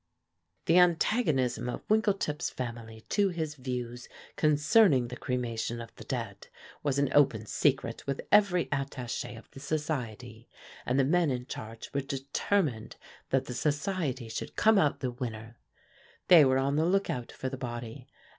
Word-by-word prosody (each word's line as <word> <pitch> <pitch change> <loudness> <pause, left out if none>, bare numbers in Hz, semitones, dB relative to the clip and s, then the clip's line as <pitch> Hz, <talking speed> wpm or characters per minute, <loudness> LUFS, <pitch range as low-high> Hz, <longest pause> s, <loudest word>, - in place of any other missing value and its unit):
The 170 +2 +5
antagonism 160 - +2
of - - -6
Winkletip's 200 -8 +1
family 115 -2 -7
to 200 -1 +2
his 160 -4 -3
views 125 -3 -5 0.3
concerning 150 - +4
the 125 - -6
cremation 120 -3 -3
of 115 - -9
the - - -11
dead 115 -6 -5 0.3
was 140 -2 0
an 140 -1 +2
open 115 -7 +4
secret 130 0 0
with 140 -1 -2
every 195 -4 +5
attaché 135 -4 -3
of 115 - -15
the - - -11
society, 125 -7 -4 0.4
and 125 +2 +2
the - - +5
men 170 +3 +2
in 125 -2 -2
charge 115 -2 -8
were 140 - 0
determined 140 - -1 0.3
that 135 0 +1
the 125 - -5
society 145 - -1
should 110 - -6
come 220 -1 +5
out 145 -5 +1
the 130 -2 -1
winner. 115 -2 -7 0.7
They 165 -5 +9
were 130 0 +3
on 140 +2 +1
the 160 - +3
lookout 180 -10 0
for 130 - -4
the 135 - -5
body. 120 0 -6
135 Hz, 155 wpm, -29 LUFS, 120-155 Hz, 0.7 s, They